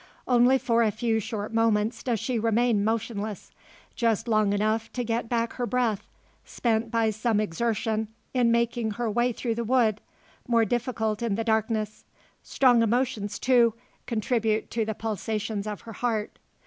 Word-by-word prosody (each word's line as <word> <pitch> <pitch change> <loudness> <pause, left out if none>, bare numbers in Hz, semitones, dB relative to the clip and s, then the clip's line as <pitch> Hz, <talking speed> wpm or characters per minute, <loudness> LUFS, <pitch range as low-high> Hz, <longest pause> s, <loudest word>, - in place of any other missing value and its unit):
Only 250 +1 +5
for 235 -2 +1
a 225 - +3
few 220 +1 0
short 220 0 -5
moments 225 0 +1
does 240 -4 -1
she 230 +2 -1
remain 225 -1 +2
motionless. 220 -2 -3 0.4
Just 230 -1 0
long 215 -3 +2
enough 215 +2 0
to 250 - -2
get 230 0 -2
back 235 -1 0
her 245 -1 -3
breath, 235 -5 -1 0.3
spent 230 -1 -1
by 225 -1 +1
some 220 0 0
exertion 220 +2 -1 0.3
in 245 -2 +3
making 235 -1 +1
her 230 0 -2
way 240 +3 +2
through 235 0 -2
the 235 +1 -3
wood 225 -3 +2 0.5
more 230 -2 +3
difficult 220 -2 -1
in 230 -4 0
the 225 - -1
darkness. 220 -1 -1 0.4
Strong 245 -3 +3
emotions, 230 -3 0
too, 240 -3 +3 0.3
contribute 220 -1 0
to 225 -1 0
the 220 0 -3
pulsations 215 -1 -3
of 210 -2 -5
her 225 - -10
heart. 220 -2 -2
225 Hz, 160 wpm, -26 LUFS, 215-235 Hz, 0.5 s, Only